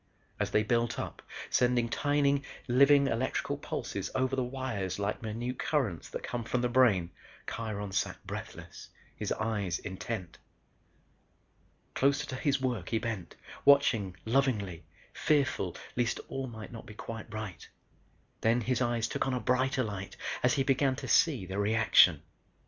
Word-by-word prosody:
As - - 0
they 105 - +3
built 115 +1 +1
up, - - -5 0.3
sending 120 -1 +3
tiny 140 +2 +2 0.3
living 140 +3 +6
electrical 130 0 -1
impulses - - -4
over 130 0 +1
the 130 - +1
wires 125 -7 -3
like 100 +1 -2
minute 120 +3 -4
currents 115 - -1
that - - -6
come 120 -1 -3
from 120 +2 -1
the 125 - +2
brain, 110 -9 +4 0.3
Kiron 105 -3 -4
sat 95 - -1
breathless; - - -8 0.3
his - - -4
eyes 105 -6 -1
intent. 95 -1 -5 1.5
Closer 140 +2 +2
to 130 - -5
his 140 +1 +1
work 120 -9 -2
he 115 - +1
bent, 110 -5 -4 0.3
watching 125 -10 +4
lovingly, 110 - 0 0.3
fearful 135 - +1 0.2
least 120 -1 0
all 135 -1 -3
might 110 -3 -8
not 115 -2 -9
be 110 - -10
quite 115 0 -7
right. 110 -5 -6 0.7
Then 115 +2 +3
his 125 +2 0
eyes 120 -2 +1
took - - -1
on 130 - 0
a - - 0
brighter 130 +1 +1
light 100 -3 -6 0.2
as 125 +3 +3
he 135 - +2
began 135 0 +2
to - - -6
see 135 - +3
the 95 +2 -4
reaction. 105 -6 +5
120 Hz, 150 wpm, -31 LUFS, 105-130 Hz, 1.5 s, living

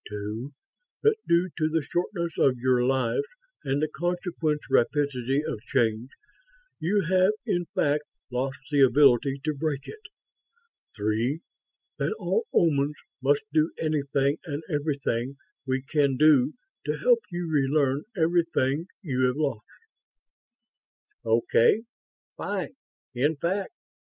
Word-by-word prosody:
Two, 105 +6 -5 0.5
that 440 0 +4
due 170 +1 +3
to 155 0 +2
the 160 -1 0
shortness 175 +1 -2
of 130 -2 +4
your 125 0 +2
lives 130 - +1 0.4
and 135 +1 0
the - - +2
consequent 170 -2 -2
rapidity 140 +1 +1
of 105 - -4
change, 115 -1 +1 0.7
you 200 +5 +1
have 185 +3 +3
in 175 0 0
fact 150 +1 +1 0.3
lost 135 +3 -2
the 145 -1 +3
ability 135 0 +5
to 155 - 0
break 145 -1 -3
it. 440 - -9 0.9
Three, 115 +8 0 0.6
that - - 0
all 455 +1 -1
Omans 150 -3 +2 0.3
must 140 +2 +2
do 155 +1 +3
anything 140 -2 0
and 150 -1 -5
everything 140 -4 -2 0.3
we 130 0 0
can 140 -2 +1
do 150 -2 +5 0.3
to - - 0
help - - +4
you 175 -1 -4
relearn 140 -2 +2 0.2
everything 165 -3 +1 0.2
you 130 -7 -1
have 125 +2 -1
lost." 140 -8 -2 1.6
"Okay. 115 - +3 0.5
Fine, - - -3 0.4
in 145 +6 +1
fact. 185 +7 -2
145 Hz, 120 wpm, -26 LUFS, 130-165 Hz, 1.6 s, ability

